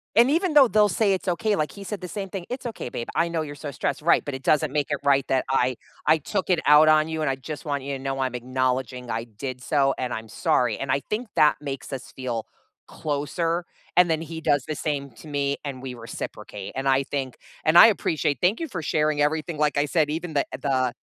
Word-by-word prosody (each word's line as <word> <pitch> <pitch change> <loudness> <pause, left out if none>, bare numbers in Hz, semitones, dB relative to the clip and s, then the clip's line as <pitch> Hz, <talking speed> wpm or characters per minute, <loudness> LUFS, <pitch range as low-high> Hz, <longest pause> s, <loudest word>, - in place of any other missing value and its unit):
and, 240 +4 +6
even 335 +2 +1
though 280 -4 +8
they'll 210 -2 +4
say 200 +1 +2
it's 190 +1 -3
okay, 200 +4 +1
like, 155 -3 -1
he 200 - -10
said 195 +1 -5
the 180 - -5
same 195 +1 -5
thing, 185 -2 -6
"It's 250 0 -5
okay, 220 - -6
babe, 120 - -5
I 170 0 +2
know 165 -1 -1
you're 145 -1 -6
so 145 0 -6
stressed." 140 +2 -2
"Right, 170 - +4
but 145 -2 -4
it 130 - -8
doesn't 150 -2 +2
make 145 -1 0
it - - 0
right 140 -1 +3
that 130 -1 +1
I 130 -1 +2 0.3
I 160 - +5
took 190 +5 -3
it 170 - +3
out 150 +1 +8
on 155 0 +5
you, 160 -1 -3
and 150 - +1
I 135 - 0
just 145 +3 -8
want 140 -2 -1
you 140 0 -4
to 135 - -11
know, 135 0 -2
I'm 130 -2 -1
acknowledging 125 0 -2
I 115 +1 -2
did 125 +3 -7
so, 135 -2 +2
and 125 -1 -2
I'm 110 0 -5
sorry," 120 0 +1
and, 135 -1 -3
I 140 - +2
think 215 +1 -2
that 150 - +5
makes 140 -1 -6
us 130 -2 -6
feel 120 -4 -4 0.4
closer, 165 +4 -2 0.3
and 180 -1 +7
then, 160 0 0
he 165 0 -6
does 145 -4 +1
the 155 - -3
same 140 -2 -2
to 155 - -14
me 140 -1 -1
and 130 -2 -5
we 130 -2 -6
reciprocate, 110 -3 -7
and 135 +1 -2
I 135 0 +3
think 135 -2 -4 0.3
and, 155 +2 +3
I - - +11
appreciate 155 - 0
thank 190 +5 +2
you 330 - -3
for 180 - -5
sharing 150 -1 +1
everything, 155 +1 0
like 150 -2 +1
I 145 - +2
said, 150 +1 +1
even 165 0 -4
the 140 - +2 0.2
the 130 -3 +1
145 Hz, 250 wpm, -25 LUFS, 130-170 Hz, 0.4 s, I